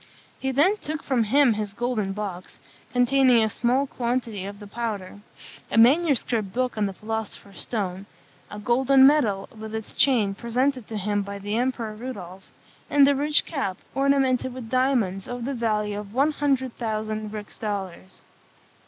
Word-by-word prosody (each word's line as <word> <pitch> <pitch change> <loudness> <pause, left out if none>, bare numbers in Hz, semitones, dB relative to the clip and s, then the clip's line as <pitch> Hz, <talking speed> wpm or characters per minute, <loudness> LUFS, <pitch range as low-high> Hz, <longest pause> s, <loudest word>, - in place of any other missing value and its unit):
He 265 - -1
then 330 +11 +3
took 310 -5 -5
from 245 -5 +1
him 270 +2 +4
his 210 -1 -4
golden 235 -5 -1
box, 195 -3 -6 0.3
containing 250 -1 +4
a 220 - +1
small 250 +6 +1
quantity 235 -6 -2
of 200 +1 -7
the 205 - -11
powder; 205 -3 -5 0.5
a - - -2
manuscript 245 - +3
book 255 +2 -1
on 210 -2 +1
the 195 - -5
philosopher's 215 -1 -6
stone; 195 -3 -3 0.4
a 210 - -8
golden 265 +5 +4
medal, 230 -10 +3
with 220 0 -7
its 220 -1 -6
chain, 230 -8 +3
presented 250 +3 -1
to 220 - -5
him 205 +1 0
by 200 0 -6
the 205 +2 -4
Emperor 235 -2 -1
Rudolph; 195 -6 -8 0.4
and 285 -1 +6
a 285 - +4
rich 295 +2 +2
cap, 235 - -3 0.2
ornamented 270 -2 +1
with 240 -3 -8
diamonds, 245 -8 +1
of 245 -1 -5
the 275 - -2
value 210 -4 -1
of 210 +1 -10
one 280 +4 +3
hundred 270 -4 0
thousand 215 -2 -3
rix 210 -1 -8
dollars. 190 -3 -5
230 Hz, 160 wpm, -25 LUFS, 205-260 Hz, 0.5 s, and